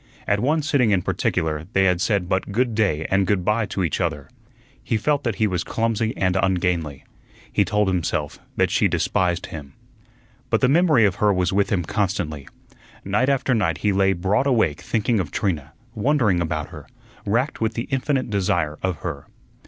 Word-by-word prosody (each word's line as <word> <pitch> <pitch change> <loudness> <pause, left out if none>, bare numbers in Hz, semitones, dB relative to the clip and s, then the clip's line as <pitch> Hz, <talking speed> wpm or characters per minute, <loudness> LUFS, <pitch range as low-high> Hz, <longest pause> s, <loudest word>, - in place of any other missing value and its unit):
At 100 - +1
one 150 +7 +1
sitting 140 -6 +2
in 95 -4 +2
particular 80 0 -1
they 95 - +3
had 90 -2 +2
said 100 -4 +1
but 95 +2 -1
good 120 +3 +1
day 95 -8 0
and 95 -1 +2
good 95 -3 0
by 105 0 +1
to 95 - -2
each 85 - -1
other. 80 -6 -2 0.5
He 115 - 0
felt 145 +6 0
that 120 -4 -1
he 110 - +1
was 95 -4 -1
clumsy 115 0 -1
and 95 -1 +1
ungainly. 90 -6 0 0.5
He - - +3
told 105 -1 +1
himself 80 -5 -1 0.2
that - - +1
she - - +3
despised 90 -1 0
him. 70 -4 -9 0.8
But - - +1
the - - +4
memory 155 -5 +4
of 95 -3 0
her 105 -1 +3
was 90 -1 0
with 100 0 +2
him 90 -4 0
constantly. 90 -8 -2 0.6
Night 105 +7 +1
after 135 -1 +1
night 100 -8 +1
he 105 - +3
lay 95 0 +3
broad 95 +9 0
awake 110 - +1
thinking 110 0 0
of 90 - -2
Trina, 80 - -2 0.2
wondering 110 -6 +2
about 80 -2 -3
her, - - -11 0.4
racked 120 +8 -1
with 110 0 0
the 115 - -3
infinite 135 -2 -1
desire 85 -6 0
of 95 -2 -1
her. 75 -5 -5
95 Hz, 185 wpm, -22 LUFS, 85-115 Hz, 0.8 s, the